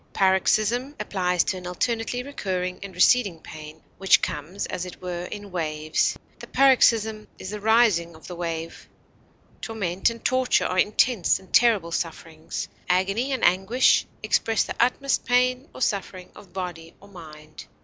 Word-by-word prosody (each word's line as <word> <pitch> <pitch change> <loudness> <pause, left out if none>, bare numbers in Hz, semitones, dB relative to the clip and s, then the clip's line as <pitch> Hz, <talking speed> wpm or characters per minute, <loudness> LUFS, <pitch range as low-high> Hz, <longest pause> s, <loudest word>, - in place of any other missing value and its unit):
Paroxysm 215 +8 +2
applies 180 -2 0
to 190 - -2
an 180 -1 -8
alternately 230 +6 -2
recurring 185 -9 -4
and 195 -2 -9
receding 195 -2 +3
pain, 155 0 -11 0.2
which 195 0 +5
comes 155 +7 -4
as 180 - -4
it 180 -1 -9
were 180 -1 -5
in 205 +1 -8
waves; 155 -3 -1 0.2
the - - -10
paroxysm 225 -5 +3
is 190 - -7
the 210 - -5
rising 210 -6 +3
of 160 - -15
the 180 - -7
wave. 165 -1 -5 0.7
Torment 195 -5 -1
and 230 0 -10
torture 255 -1 +2
are 185 - 0
intense 210 -1 +2
and 190 - -20
terrible 215 -8 +4
sufferings. 165 -1 -5 0.2
Agony 195 +9 +1
and 260 -3 0
anguish 190 +8 +3 0.2
express 225 -1 +1
the - - -5
utmost 270 +2 +1
pain 250 +3 +1
or - - -11
suffering 190 -2 -3
of 200 - -15
body 175 -3 -6
or 200 - -16
mind. 155 -5 -12
190 Hz, 150 wpm, -24 LUFS, 175-230 Hz, 0.7 s, which